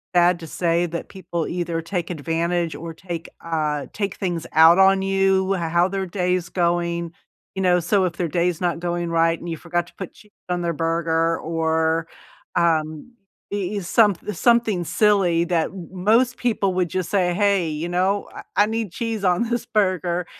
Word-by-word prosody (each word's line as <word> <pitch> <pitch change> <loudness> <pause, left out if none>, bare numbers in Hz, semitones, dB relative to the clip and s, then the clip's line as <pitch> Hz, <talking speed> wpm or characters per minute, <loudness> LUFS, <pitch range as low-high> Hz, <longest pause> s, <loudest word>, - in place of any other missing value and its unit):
sad 175 0 +4
to 165 - -9
say, 170 +2 0
that 170 0 -6
people 175 -4 -4
either 170 -2 -2
take 175 0 -3
advantage 170 +1 -1
or 165 0 -7
take 170 -1 -6 0.2
uh, 150 -3 -1
take 200 -2 -3
things 175 -4 -3
out 165 +3 +7
on 190 0 +5
you, 195 0 +2
how 170 0 +1
their 195 0 -3
day 180 0 0
is 175 -2 -4
going. 170 -1 0 0.4
You 190 - -2
know, 180 -1 +4
so 185 +3 +2
if 175 - -2
their 175 -1 -2
day 170 +3 +1
is 175 -3 -2
not 175 -2 -1
going 175 -1 -2
right 165 0 +2
and 175 - -9
you 165 -2 -3
forgot 175 +1 -2
to - - -18
put 190 - -6
cheese 210 -1 -20 0.2
on 180 0 -1
their 170 -1 0
burger, 165 +1 0
or, 160 0 0 0.5
um, 160 +3 0 0.4
e 205 0 -2
e - - 0
some 205 +2 +3 0.2
something 230 -7 +2
silly 185 -3 +2
that 170 -2 +1
m 180 -3 -9
most 225 +7 +2
people 210 -6 0
would 180 -2 0
just 185 -1 -3
say, 185 -4 +2
"Hey, 200 -3 +2
you 155 +3 -4
know, 190 +3 0
I - - -8 0.2
I - - +2
need 225 -3 -3
cheese 225 0 -3
on 180 +4 +2
this 235 0 -2
burger," 185 -6 0
175 Hz, 190 wpm, -22 LUFS, 165-195 Hz, 0.5 s, out